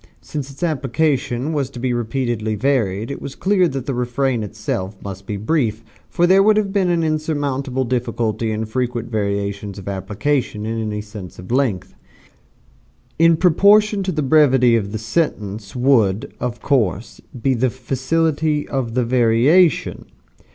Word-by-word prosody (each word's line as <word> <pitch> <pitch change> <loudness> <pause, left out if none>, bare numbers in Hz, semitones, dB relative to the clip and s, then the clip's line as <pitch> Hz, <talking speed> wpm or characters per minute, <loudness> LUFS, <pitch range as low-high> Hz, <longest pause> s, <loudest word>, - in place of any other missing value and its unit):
Since 145 -2 -6
its 140 +5 -9
application 145 -2 0
was 140 -4 -1
to 130 - -9
be 125 0 -1
repeatedly 120 -2 -2
varied 110 -2 0
it 140 - -6
was 135 - -7
clear 190 -2 +2
that 135 -4 -4
the 140 - -2
refrain 125 0 -1
itself 105 -2 -4
must 95 -1 -8
be 105 - -3
brief, 115 -1 -1 0.3
for 175 - +2
there 190 +2 +5
would 215 +1 +4
have 200 -2 0
been 190 -3 +2
an 170 -1 +1
insurmountable 145 -4 -1
difficulty 115 -2 -1
in 110 +1 -2
frequent 120 0 -3
variations 100 -1 -2
of 100 - -10
application 105 +4 -2
in 115 0 -2
any 105 -1 -3
sentence 105 -4 -10
of 90 +5 -10
length. 125 -8 0 1.3
In 165 0 +5
proportion 200 +4 +4
to 190 -1 -1
the 155 -3 -1
brevity 130 -4 +4
of 100 -3 -1
the 110 - -3
sentence 110 -5 -2
would, 120 -3 +2
of 120 -1 -4
course, 115 - 0 0.2
be 135 +3 +1
the 130 +1 +1
facility 150 +4 -1
of 125 -4 -3
the 125 -2 +1
variation. 125 +8 +3
125 Hz, 155 wpm, -20 LUFS, 110-150 Hz, 1.3 s, there